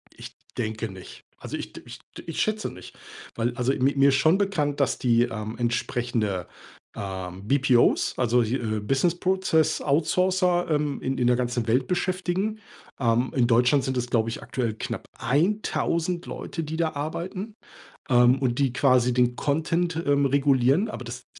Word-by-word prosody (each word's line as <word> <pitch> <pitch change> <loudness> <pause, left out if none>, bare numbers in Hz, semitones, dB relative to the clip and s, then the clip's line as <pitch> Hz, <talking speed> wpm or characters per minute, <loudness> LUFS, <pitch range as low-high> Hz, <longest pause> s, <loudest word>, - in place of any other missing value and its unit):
Ich - - -11 0.2
denke 110 -1 -3
nicht. 95 -1 -12
Also - - -7
ich - - -7
d - - -10
ich - - -10 0.2
d - - -9
ich 165 - -2
schätze 215 0 -1
nicht, - - -12 0.4
weil 120 +1 -1
also 125 +2 +1
mi 135 +2 +1
mir 140 0 +5
ist 135 - +3
schon 160 +7 +4
bekannt, 150 -8 -1
dass 140 - +1
die, 120 -1 +3
ähm, 110 -1 -4
entsprechende, 120 -5 -1 0.5
ähm, 95 0 -6
BPOs, 130 -2 +3
also, 120 0 +2
hi 115 +4 -1
äh, 110 -4 -2
Business 135 +10 +1
Process 175 -4 +1
Outsourcer, 175 +4 +1
ähm, 150 -2 0
in 130 0 -2
in 125 - +1
der 125 - +4
ganzen 120 -1 -1
Welt 125 +3 +2
beschäftigen. 185 +4 -1 0.4
Ähm, 120 +1 +1
in 125 -3 +3
Deutschland 125 +3 +3
sind 130 - -2
es 125 -1 -1
glaube 115 -2 +1
ich 115 - -6
aktuell 120 -4 -2
knapp 110 - -5
1.000 170 - 0
Leute, 165 - -5
die 155 +2 -5
da 165 -1 +1
arbeiten, 185 +8 -5 0.5
ähm, 125 +1 +5
und 125 -2 -1
die 135 -3 +1
quasi 125 -2 +3
den 125 0 +2
Content, 165 +4 0
ähm, 140 0 +3
regulieren, 140 - +3
aber 130 - -7
das 120 +1 -8
135 Hz, 170 wpm, -25 LUFS, 120-165 Hz, 0.5 s, mir